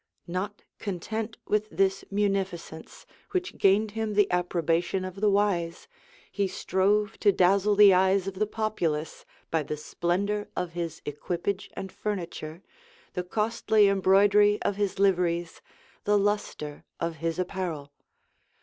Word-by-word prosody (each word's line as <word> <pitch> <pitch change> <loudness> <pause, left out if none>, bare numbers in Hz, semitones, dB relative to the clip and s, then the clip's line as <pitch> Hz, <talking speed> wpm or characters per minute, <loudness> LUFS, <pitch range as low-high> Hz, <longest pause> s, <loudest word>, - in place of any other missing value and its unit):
[*] - - -53
Not 190 +4 -4 0.2
content 215 +3 -4
with 210 0 0
this 195 -1 +1
munificence, 195 -5 -3 0.3
which 370 0 -2
gained 205 +2 +4
him 220 -1 -3
the 205 -1 +3
approbation 180 +1 0
of 185 +1 -7
the 210 - +4
wise, 195 -5 0 0.4
he 200 -1 0
strove 205 +3 0
to 205 - +5
dazzle 195 +3 +3
the 205 -1 +8
eyes 190 +1 +3
of 195 - -3
the 210 +3 -1
populace 175 -9 -2 0.3
by 160 - +2
the 150 +1 -4
splendor 200 +7 -1
of 180 -2 -2
his 165 -2 -5
equipage 175 +6 -3
and 190 - -6
furniture, 175 -4 -5 0.5
the 180 - -1
costly 215 +2 +2
embroidery 200 +2 +4
of 200 - 0
his 200 -1 -1
liveries, 175 -3 +1 0.4
the 210 0 +4
lustre 200 -7 -2 0.2
of 165 -1 -2
his 165 0 -2
apparel. 175 -6 -4
195 Hz, 135 wpm, -27 LUFS, 175-205 Hz, 0.5 s, the